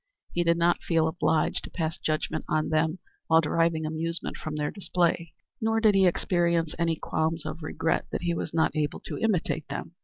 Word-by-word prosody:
He 175 Hz, -, +1 dB
did 170 Hz, 0 st, +3 dB
not 170 Hz, +1 st, +2 dB
feel 165 Hz, -2 st, +2 dB
obliged 160 Hz, -1 st, +1 dB
to -, -, -7 dB
pass 160 Hz, -2 st, -2 dB
judgment 155 Hz, 0 st, -2 dB
on 155 Hz, 0 st, +1 dB
them 160 Hz, +2 st, +1 dB, 0.3 s
while 160 Hz, 0 st, +6 dB
deriving 165 Hz, 0 st, +1 dB
amusement 165 Hz, +2 st, -2 dB
from 155 Hz, -1 st, -5 dB
their 150 Hz, -1 st, -1 dB
display, 175 Hz, -4 st, 0 dB, 0.3 s
nor 225 Hz, 0 st, +2 dB
did 220 Hz, -2 st, +5 dB
he 195 Hz, -1 st, +5 dB
experience 170 Hz, -2 st, +1 dB
any 165 Hz, -1 st, +2 dB
qualms 160 Hz, 0 st, -1 dB
of 155 Hz, +2 st, -5 dB
regret 160 Hz, +1 st, -1 dB
that -, -, -3 dB
he 170 Hz, -1 st, +1 dB
was 165 Hz, -, -3 dB
not 160 Hz, 0 st, +1 dB
able 150 Hz, -1 st, -1 dB
to -, -, -6 dB
imitate 180 Hz, -7 st, 0 dB
them. 140 Hz, +3 st, -5 dB
165 Hz, 190 wpm, -27 LUFS, 155-170 Hz, 0.3 s, while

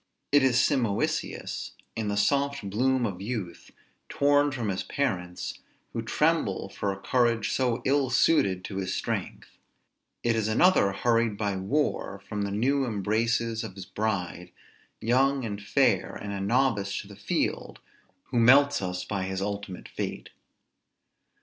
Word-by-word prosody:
It 145 Hz, 0 st, +6 dB
is 130 Hz, -2 st, +3 dB
Simoisius, 120 Hz, -10 st, -1 dB, 0.2 s
in 110 Hz, -2 st, -2 dB
the 105 Hz, 0 st, -1 dB
soft 140 Hz, +2 st, +1 dB
bloom 125 Hz, +5 st, +1 dB
of 95 Hz, -4 st, -4 dB
youth, 100 Hz, -6 st, -5 dB, 0.4 s
torn 145 Hz, +1 st, +3 dB
from 120 Hz, -6 st, -3 dB
his 95 Hz, -1 st, -1 dB
parents, 90 Hz, -11 st, -3 dB, 0.3 s
who -, -, -2 dB
tremble -, -, 0 dB
for 100 Hz, -, -2 dB
a 95 Hz, -, -6 dB
courage 115 Hz, 0 st, +1 dB
so 125 Hz, -3 st, 0 dB
ill 135 Hz, -1 st, +2 dB
suited 100 Hz, -, +3 dB
to 95 Hz, -, -6 dB
his 95 Hz, -1 st, -2 dB
strength; -, -, -4 dB, 0.6 s
it 120 Hz, -1 st, +2 dB
is 110 Hz, -1 st, 0 dB
another 110 Hz, -, +4 dB
hurried 115 Hz, +1 st, +1 dB
by 100 Hz, -2 st, -1 dB
war 100 Hz, 0 st, -1 dB
from 105 Hz, -1 st, -3 dB
the 100 Hz, -, -1 dB
new 135 Hz, +7 st, +1 dB
embraces 115 Hz, +1 st, 0 dB
of 105 Hz, -4 st, -7 dB
his 95 Hz, -2 st, -8 dB
bride, 95 Hz, -4 st, -3 dB, 0.5 s
young 130 Hz, +2 st, +2 dB
and 105 Hz, -2 st, -4 dB
fair, 100 Hz, -, +2 dB
and 100 Hz, 0 st, -5 dB
a 100 Hz, -, -3 dB
novice 105 Hz, -2 st, +1 dB
to -, -, -14 dB
the -, -, -11 dB
field, -, -, -2 dB, 0.5 s
who 120 Hz, -, +2 dB
melts 140 Hz, +4 st, +6 dB
us 90 Hz, -1 st, -3 dB
by 95 Hz, -1 st, -2 dB
his 95 Hz, 0 st, -3 dB
untimely 100 Hz, -1 st, -4 dB
fate. -, -, -5 dB
110 Hz, 150 wpm, -27 LUFS, 100-130 Hz, 0.6 s, It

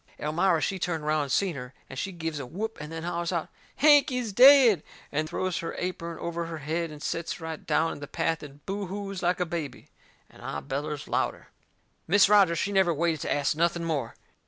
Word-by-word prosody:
Elmira 165 Hz, +3 st, +1 dB
she 190 Hz, +4 st, -1 dB
turned 165 Hz, -3 st, -2 dB
around 155 Hz, 0 st, +1 dB
and 140 Hz, -2 st, -4 dB
seen 185 Hz, +2 st, +1 dB
her, 125 Hz, -1 st, -8 dB
and 135 Hz, -, -7 dB
she 195 Hz, -, -3 dB
gives 165 Hz, -4 st, -4 dB
a 140 Hz, -, -5 dB
whoop 220 Hz, -, -4 dB
and 150 Hz, +1 st, -7 dB
then 165 Hz, 0 st, -5 dB
hollers 170 Hz, 0 st, -2 dB
out: 170 Hz, -3 st, -2 dB, 0.3 s
"Hank 290 Hz, -1 st, +6 dB
is 245 Hz, -5 st, -2 dB
dead!" 250 Hz, -, +8 dB, 0.3 s
and 155 Hz, +2 st, -1 dB
throws 185 Hz, +1 st, -2 dB
her 165 Hz, -, -4 dB
apern 170 Hz, -2 st, -4 dB
over 170 Hz, 0 st, -3 dB
her 165 Hz, -1 st, -6 dB
head 160 Hz, +3 st, -2 dB
and 150 Hz, -1 st, -10 dB
sets 170 Hz, +1 st, -3 dB
right 160 Hz, -1 st, -6 dB
down 165 Hz, +1 st, +2 dB
in -, -, -7 dB
the 145 Hz, -, -7 dB
path 165 Hz, +1 st, -1 dB
and 145 Hz, 0 st, -12 dB
boo 195 Hz, 0 st, -3 dB
hoos 195 Hz, 0 st, -5 dB
like 180 Hz, +1 st, +1 dB
a 180 Hz, -, +1 dB
baby. 165 Hz, -4 st, -5 dB, 0.4 s
And -, -, -18 dB
I -, -, -4 dB
bellers 145 Hz, +2 st, -4 dB
louder. -, -, -2 dB, 0.6 s
Mis' 200 Hz, +4 st, +6 dB
Rogers, 195 Hz, -5 st, +5 dB
she 205 Hz, -, -1 dB
never 190 Hz, -3 st, +3 dB
waited 165 Hz, 0 st, 0 dB
to -, -, -3 dB
ast 145 Hz, 0 st, +1 dB
nothing 170 Hz, +1 st, +1 dB
more. 160 Hz, -4 st, -2 dB
170 Hz, 215 wpm, -27 LUFS, 155-190 Hz, 0.6 s, dead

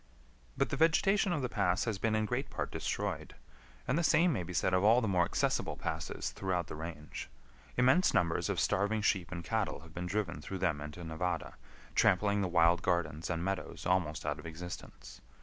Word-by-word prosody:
But -, -, +1 dB
the -, -, -1 dB
vegetation 190 Hz, +4 st, +3 dB
of 150 Hz, -5 st, 0 dB
the -, -, +1 dB
pass 100 Hz, -4 st, +1 dB
has 110 Hz, -5 st, -2 dB
been 110 Hz, +1 st, +1 dB
in 110 Hz, 0 st, +1 dB
great 125 Hz, +5 st, -2 dB
part -, -, -3 dB
destroyed, -, -, -3 dB, 0.5 s
and 135 Hz, +6 st, +2 dB
the -, -, +1 dB
same 165 Hz, +1 st, +4 dB
may 105 Hz, -, -1 dB
be 90 Hz, +1 st, -6 dB
said 90 Hz, +1 st, +1 dB
of 95 Hz, +1 st, +3 dB
all 115 Hz, +4 st, +6 dB
the 115 Hz, -, -1 dB
more 90 Hz, -3 st, +3 dB
accessible -, -, 0 dB
passes -, -, -3 dB
throughout 90 Hz, -3 st, -1 dB
the -, -, -7 dB
range. 80 Hz, -3 st, -7 dB, 0.5 s
Immense 130 Hz, +9 st, +5 dB
numbers 85 Hz, -2 st, +1 dB
of -, -, 0 dB
starving 105 Hz, +2 st, +1 dB
sheep 95 Hz, -3 st, +1 dB
and 85 Hz, -2 st, -5 dB
cattle 110 Hz, -7 st, -1 dB
have 80 Hz, 0 st, -14 dB
been 90 Hz, +1 st, -4 dB
driven 95 Hz, -2 st, -2 dB
through 95 Hz, -, -5 dB
them 85 Hz, -6 st, 0 dB
into 75 Hz, +4 st, -7 dB
Nevada, 80 Hz, +2 st, -3 dB, 0.4 s
trampling 100 Hz, +2 st, +3 dB
the 95 Hz, -, +1 dB
wild 85 Hz, 0 st, +4 dB
gardens 80 Hz, -3 st, -1 dB
and 85 Hz, 0 st, -1 dB
meadows 95 Hz, 0 st, -3 dB
almost 90 Hz, -4 st, 0 dB
out -, -, -1 dB
of -, -, -8 dB
existence. 80 Hz, -7 st, -9 dB
90 Hz, 200 wpm, -32 LUFS, 85-110 Hz, 0.5 s, all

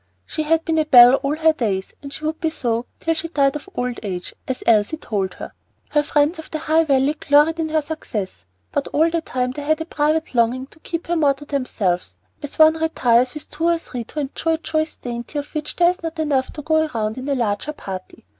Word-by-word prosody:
She -, -, -3 dB
had 325 Hz, +1 st, +1 dB
been 320 Hz, -1 st, +1 dB
a 310 Hz, -, +2 dB
belle 245 Hz, -4 st, +9 dB
all 275 Hz, +2 st, -1 dB
her 320 Hz, 0 st, +3 dB
days, 200 Hz, -9 st, -2 dB
and 280 Hz, -, -8 dB
she 305 Hz, +2 st, -6 dB
would 315 Hz, +1 st, -2 dB
be 325 Hz, -, +1 dB
so 235 Hz, -6 st, -2 dB
till 330 Hz, -, 0 dB
she 330 Hz, +1 st, -4 dB
died 280 Hz, -4 st, +2 dB
of 300 Hz, +6 st, -7 dB
old 245 Hz, -1 st, -2 dB
age, 185 Hz, -4 st, -5 dB
as 260 Hz, -1 st, -3 dB
Elsie 220 Hz, +6 st, +3 dB
told 195 Hz, -10 st, -3 dB
her. -, -, -8 dB, 0.4 s
Her 295 Hz, -, +3 dB
friends 295 Hz, +3 st, +1 dB
of 320 Hz, -, -9 dB
the 315 Hz, -, -3 dB
High 320 Hz, +1 st, +2 dB
Valley 275 Hz, 0 st, +3 dB
gloried 305 Hz, +2 st, +3 dB
in 320 Hz, -1 st, -1 dB
her 310 Hz, -1 st, +1 dB
success; 210 Hz, -, -5 dB, 0.2 s
but 285 Hz, -, -1 dB
all 320 Hz, +3 st, +2 dB
the 335 Hz, 0 st, 0 dB
time 250 Hz, -4 st, -2 dB
they 290 Hz, -, -6 dB
had 310 Hz, +2 st, +1 dB
a 320 Hz, -, -3 dB
private 310 Hz, -1 st, 0 dB
longing 245 Hz, +2 st, +2 dB
to 325 Hz, -, -19 dB
keep 335 Hz, +1 st, -5 dB
her 345 Hz, -, -1 dB
more 290 Hz, -4 st, +3 dB
to 290 Hz, +2 st, -12 dB
themselves, 225 Hz, -11 st, -2 dB, 0.2 s
as 290 Hz, -1 st, -7 dB
one 315 Hz, 0 st, +6 dB
retires 255 Hz, -5 st, +2 dB
with 300 Hz, -, -9 dB
two 320 Hz, +2 st, -2 dB
or 340 Hz, 0 st, +3 dB
three 250 Hz, -7 st, -6 dB
to 300 Hz, -, -4 dB
enjoy 300 Hz, +4 st, -1 dB
a -, -, 0 dB
choice 315 Hz, -1 st, -2 dB
dainty 240 Hz, +4 st, -6 dB
of 290 Hz, 0 st, -5 dB
which 305 Hz, -1 st, -3 dB
there 350 Hz, 0 st, +5 dB
is 360 Hz, -, -10 dB
not 330 Hz, -1 st, -5 dB
enough 285 Hz, -4 st, 0 dB
to 300 Hz, -, -7 dB
go 315 Hz, +1 st, +2 dB
round 220 Hz, +2 st, -1 dB
in 265 Hz, +3 st, -5 dB
a 280 Hz, -, +1 dB
larger 230 Hz, +3 st, -1 dB
company. 185 Hz, -, -8 dB
295 Hz, 240 wpm, -21 LUFS, 250-315 Hz, 0.4 s, belle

